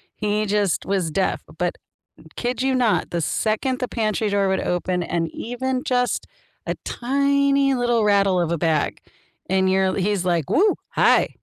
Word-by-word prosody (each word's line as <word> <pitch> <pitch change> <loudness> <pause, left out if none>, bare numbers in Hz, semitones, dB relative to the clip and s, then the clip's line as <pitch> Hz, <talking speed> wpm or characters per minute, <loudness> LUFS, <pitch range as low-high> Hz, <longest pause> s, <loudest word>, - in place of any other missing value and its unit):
he 210 0 -1
just 205 -3 0
was 190 -4 0
deaf, 190 +5 0 0.2
but, - - -1 0.6
kid 245 0 -2
you 265 0 +1
not, 245 -4 +1
the 170 -1 -1
second 220 - -1
the 250 - -2
pantry 215 -2 -1
door 200 -1 +1
would 190 - +1
open 180 0 -1
and 165 -1 -2
even 255 +2 -3
just 250 -1 0 0.4
a - - -2
tiny 280 +1 +2
little 240 -3 +1
rattle 200 -3 +3
of 170 - -1
a 170 - 0
bag 160 -2 0 0.5
and 190 0 +2
you're 190 0 +2
he's 195 -1 0
like, 170 -5 0
"Woo, 410 +3 +3
hi." - - +3
210 Hz, 165 wpm, -22 LUFS, 185-250 Hz, 0.6 s, rattle